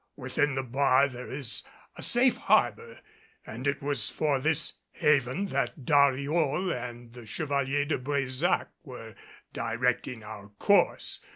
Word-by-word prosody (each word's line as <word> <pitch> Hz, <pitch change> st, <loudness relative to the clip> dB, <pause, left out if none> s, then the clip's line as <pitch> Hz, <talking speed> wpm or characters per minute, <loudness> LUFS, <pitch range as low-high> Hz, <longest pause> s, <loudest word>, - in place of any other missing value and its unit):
Within 135 Hz, +1 st, -1 dB
the 135 Hz, -, -1 dB
bar 135 Hz, +2 st, +3 dB
there 125 Hz, -1 st, -9 dB
is 130 Hz, -5 st, -2 dB, 0.3 s
a -, -, -9 dB
safe 245 Hz, +1 st, +3 dB
harbor, 465 Hz, +1 st, +1 dB, 0.5 s
and 125 Hz, +5 st, -6 dB
it 140 Hz, 0 st, -1 dB
was 140 Hz, -7 st, +2 dB
for 145 Hz, -3 st, 0 dB
this 155 Hz, +2 st, 0 dB, 0.2 s
haven 145 Hz, +5 st, +1 dB
that 130 Hz, -2 st, -2 dB
Dariol 145 Hz, +5 st, +2 dB
and 120 Hz, -1 st, -7 dB
the 120 Hz, -2 st, -12 dB
Chevalier 140 Hz, +1 st, 0 dB
de 145 Hz, -, -1 dB
Brésac 140 Hz, +4 st, 0 dB
were 120 Hz, -6 st, -10 dB, 0.4 s
directing 125 Hz, 0 st, -1 dB
our 105 Hz, -1 st, -9 dB
course. 200 Hz, -, +2 dB
135 Hz, 130 wpm, -28 LUFS, 125-145 Hz, 0.5 s, bar